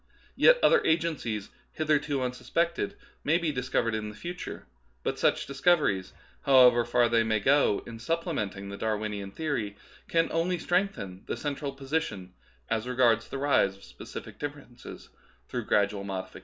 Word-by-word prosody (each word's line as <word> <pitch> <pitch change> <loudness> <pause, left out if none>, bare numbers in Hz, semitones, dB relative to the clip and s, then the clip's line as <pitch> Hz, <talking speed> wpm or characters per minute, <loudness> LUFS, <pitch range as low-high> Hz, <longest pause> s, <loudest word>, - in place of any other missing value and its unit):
Yet - - +6
other 480 - +5
agencies, 155 - -1 0.2
hitherto 150 -3 +1
unsuspected, 165 +7 -1 0.3
may 160 +3 +3
be 170 -3 -1
dis 125 -2 -4
covered 115 -3 +1
in 110 -1 -3
the 105 - -10
future; 175 +8 -7 0.4
but - - -2
such - - +2
discoveries, 140 - +2 0.3
how 130 -3 +7
ever 120 -1 +5
far 120 0 +3
they 115 0 +3
may 110 -1 +1
go 135 -1 +3
in 115 -1 -9
supplementing 115 - -2
the 100 - -6
Dar 110 0 0
winian 105 -2 -4
theory, 115 -9 -3 0.3
can 165 0 +1
only 170 +2 0
strengthen 175 - -1
the - - -3
central 145 -1 -3
position 135 - -3 0.3
as 115 +2 -1
regards 120 -3 +3
the - - -5
rise 135 -9 +2
of - - -19
specific 60 0 -10
differences 145 -4 -8 0.4
through - - -4
gradual 100 -1 +1
modifications. 95 -1 -5
125 Hz, 155 wpm, -28 LUFS, 105-155 Hz, 0.4 s, how